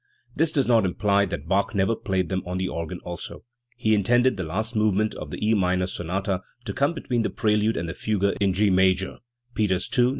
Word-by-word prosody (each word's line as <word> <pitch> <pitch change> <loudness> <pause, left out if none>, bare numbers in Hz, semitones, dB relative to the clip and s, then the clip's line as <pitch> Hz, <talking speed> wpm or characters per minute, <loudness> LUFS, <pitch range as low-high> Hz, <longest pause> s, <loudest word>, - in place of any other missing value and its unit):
This 160 0 +2
does 140 -4 +1
not 115 -3 +4
imply 100 +2 +2
that 80 -5 -5
Bach 100 +3 +1
never 100 +4 +2
played 95 -4 -1
them 95 -1 -1
on 90 +1 -4
the 95 0 -1
organ 85 +1 -4
also. 85 -1 -7 0.3
He 110 -3 +2
intended 120 +5 +3
the 95 - -4
last 110 +8 -2
movement 110 0 +2
of - - -7
the - - -6
E 110 - +4
minor 90 -2 +2
sonata 95 +1 -2 0.2
to - - -3
come 140 +5 +1
between 125 -6 -1
the - - 0
prelude 105 +1 +1
and 85 - -2
the 80 - -4
fugue 100 0 0
in 100 -1 +3
G 100 +1 +2
major 95 0 +2 0.3
(Peters 95 -4 0
II, 125 - +5
No. - - +3
100 Hz, 220 wpm, -25 LUFS, 95-110 Hz, 0.3 s, II